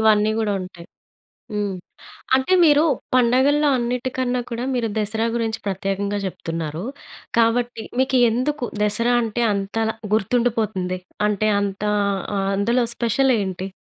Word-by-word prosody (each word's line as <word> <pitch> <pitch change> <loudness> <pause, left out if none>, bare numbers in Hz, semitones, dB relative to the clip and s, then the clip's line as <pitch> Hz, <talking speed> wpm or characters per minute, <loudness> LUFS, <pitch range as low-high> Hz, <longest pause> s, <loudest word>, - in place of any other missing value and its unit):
ఇవన్నీ 215 -1 +4
గూడా 215 -2 0
ఉంటాయి. 175 -2 -10 0.7
హ్మ్. 205 -2 -1 0.6
అంటే 265 +7 +2
మీరు 295 -1 +5 0.3
పండగల్లో 260 +5 +4
అన్నిటికన్నా 250 +1 -1
కూడా 235 +1 -3
మీరు 240 -2 0
దసరా 220 +2 0
గురించి 225 -1 -1
ప్రత్యేకంగా 195 +1 -2
జెప్తున్నారు. 165 -2 -4 0.5
కాబట్టి 235 0 +1 0.2
మీకు 260 -1 +2
ఎందుకు 255 +4 -1 0.2
దసరా 230 +4 +1
అంటే 230 +1 -2
అంత‌ల 205 +3 -1 0.2
గుర్తుండిపోతుంది? 215 -4 0 0.3
అంటే 210 +1 +1
అంత 200 0 -3 0.5
ఆహ్, 195 0 0
అందులో 235 +5 +2
స్పెషలేంటి? 225 -7 +1
225 Hz, 115 wpm, -22 LUFS, 200-245 Hz, 0.7 s, మీరు